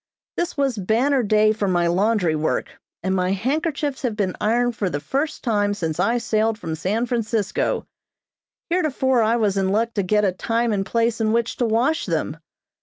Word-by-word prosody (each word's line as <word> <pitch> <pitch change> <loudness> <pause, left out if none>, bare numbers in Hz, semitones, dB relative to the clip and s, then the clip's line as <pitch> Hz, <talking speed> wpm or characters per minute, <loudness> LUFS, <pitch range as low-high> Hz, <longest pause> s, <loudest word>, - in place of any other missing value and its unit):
This 345 -2 -2
was 270 -6 0
banner 245 +8 +2
day 215 -1 +3
for 210 -2 -2
my 175 -2 +2
laundry 185 -1 +2
work, 155 +1 -1 0.3
and 190 +1 0
my 185 0 +1
handkerchiefs 285 - -1
have 240 -5 -1
been 195 -4 -1
ironed 240 +2 +1
for 200 -4 -1
the 145 -3 -3
first 275 - -2
time 205 -4 +1
since 165 -4 -3
I 230 +7 +2
sailed 225 -1 0
from 165 -7 -5
San 200 +9 -1
Francisco. 225 -4 -1 0.9
Heretofore 265 -8 +2
I 225 +1 +3
was 210 -4 +1
in 190 -1 +1
luck 230 +3 0
to 205 - 0
get 210 +2 +2
a 190 - +2
time 230 +4 -1
and 195 -1 0
place 230 +2 0
in 215 0 +2
which 235 0 0
to 240 - +1
wash 245 +8 +1
them. 160 -2 -2
220 Hz, 185 wpm, -22 LUFS, 195-240 Hz, 0.9 s, day